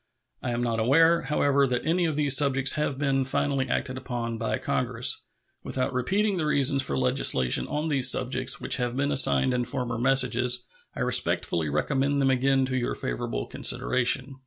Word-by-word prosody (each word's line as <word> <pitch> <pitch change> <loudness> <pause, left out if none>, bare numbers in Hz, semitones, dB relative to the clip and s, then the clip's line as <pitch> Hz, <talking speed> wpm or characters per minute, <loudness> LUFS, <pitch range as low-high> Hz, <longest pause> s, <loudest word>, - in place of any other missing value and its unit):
I 130 - -4
am 120 0 -2
not 115 -2 -2
aware, 165 +8 +3
however, 140 -1 +1
that 125 0 -3
any 170 +2 +1
of 160 -3 -2
these 145 -2 +3
subjects 135 -2 +2
have 150 -3 -2
been 135 -1 0
finally 135 +1 -2
acted 130 -1 -3
upon 120 -3 -5
by 115 - -2
Congress. - - -1 0.4
Without 130 0 -3
repeating 195 - -1
the 160 - -2
reasons 140 -2 +2
for - - -3
legislation 125 - +2
on 150 +2 -3
these 135 -4 +3
subjects 130 0 0
which - - 0
have 125 -1 -3
been 140 +1 -1
assigned 135 -2 +3
in 125 -1 -1
former 125 -2 -4
messages, 125 -1 +3 0.3
I - - -5
respectfully 80 -3 -1
recommend 135 - -1
them 135 -1 +2
again 135 +1 +1
to 130 0 -3
your 120 - -2
favorable - - -4
consideration. 130 +1 0
130 Hz, 175 wpm, -25 LUFS, 125-140 Hz, 0.4 s, aware